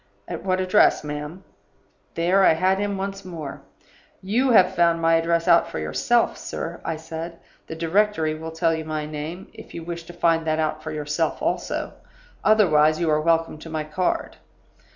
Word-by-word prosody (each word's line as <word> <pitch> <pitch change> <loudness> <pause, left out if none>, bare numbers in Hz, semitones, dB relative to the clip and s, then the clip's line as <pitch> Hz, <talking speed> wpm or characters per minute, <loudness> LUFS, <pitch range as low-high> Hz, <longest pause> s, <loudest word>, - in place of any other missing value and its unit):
"'At - - -6
what 185 -1 0
address, 185 -1 +3
ma'am?' 150 +5 -6 0.7
"There, 180 +4 +3
I - - +6
had 185 +4 +1
him 200 -1 -1
once 195 0 -4
more. 160 -6 -7 0.6
'You 235 +8 +1
have 190 -6 +5
found 170 -2 +3
my 165 0 +3
address 165 0 +1
out 170 - +5
for - - -6
yourself, 80 0 +1
sir,' - - -6
I 165 - -2
said. 165 +1 -7 0.3
'The 160 - -6
directory 165 -1 +1
will 160 +1 -6
tell 165 0 +1
you 160 0 -3
my 155 -1 -3
name, 155 +5 -7
if - - -12
you 170 - -6
wish 170 0 -6
to 175 - -11
find 165 -1 +2
that 155 0 +1
out 155 0 -1
for 155 - -6
yourself 150 +1 -2
also; - - -2 0.5
otherwise, 155 -8 +4
you 165 -2 +1
are 150 0 +2
welcome 165 -1 +1
to 165 - -10
my 155 -1 -3
card. 165 +4 -2
165 Hz, 180 wpm, -23 LUFS, 155-185 Hz, 0.7 s, I